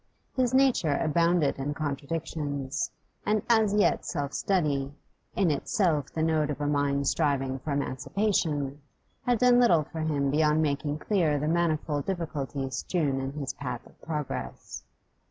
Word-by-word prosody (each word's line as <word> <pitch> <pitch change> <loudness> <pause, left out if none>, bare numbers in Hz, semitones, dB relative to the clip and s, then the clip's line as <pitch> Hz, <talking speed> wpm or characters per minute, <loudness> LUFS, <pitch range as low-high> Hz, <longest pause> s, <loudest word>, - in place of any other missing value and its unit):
His 255 -2 +2
nature 260 - +3
abounded 170 -1 +2
in 145 +2 -2
contradictions, 145 -1 -3 0.3
and 210 0 +1
as 220 -3 +4
yet 210 - +3
self 145 -4 -3
study 145 -8 0 0.4
in 185 -5 +3
itself 150 0 +1
the 160 - -1
note 155 -2 +2
of 150 - -3
a 145 - -1
mind 140 -1 +1
striving 135 -4 +1
for 150 - -5
emancipation 145 0 -1 0.5
had 245 -1 +4
done 245 +1 +5
little 175 -11 +5
for 160 - -8
him 145 -3 0
beyond 150 +1 +3
making 145 -1 0
clear 160 -4 +1
the 150 +2 -1
manifold 155 -3 0
difficulties 140 -7 -3
strewn 145 -6 0
in 135 +1 -4
his 140 -2 -4
path 125 -4 -5
of - - -20
progress. 150 - -5
150 Hz, 145 wpm, -28 LUFS, 140-170 Hz, 0.5 s, done